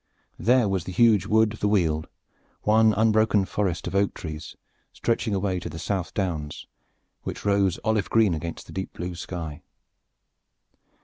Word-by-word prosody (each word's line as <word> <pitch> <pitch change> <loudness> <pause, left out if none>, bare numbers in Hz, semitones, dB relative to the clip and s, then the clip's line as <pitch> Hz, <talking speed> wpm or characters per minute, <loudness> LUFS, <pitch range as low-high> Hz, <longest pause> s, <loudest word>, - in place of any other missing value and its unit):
There 125 -1 +4
was 95 -3 -1
the - - -5
huge 105 -2 +4
wood 110 0 +3
of 110 - -10
the 105 - +1
Weald, 80 -7 +1 0.6
one 110 +1 +5
unbroken 110 -1 +3
forest 95 -4 -2
of - - -4
oak 100 0 +1
trees 80 -2 -7 0.4
stretching 115 -2 -1
away 95 -1 0
to - - -6
the - - -7
South 95 0 -3
Downs, 80 -7 -3 0.6
which - - -6
rose 100 -3 +2
olive 110 -4 +1
green 110 -5 +4
against 80 +1 -5
the - - -12
deep 95 0 -4
blue 90 0 -5
sky. 85 -3 -6
100 Hz, 160 wpm, -25 LUFS, 85-110 Hz, 0.6 s, one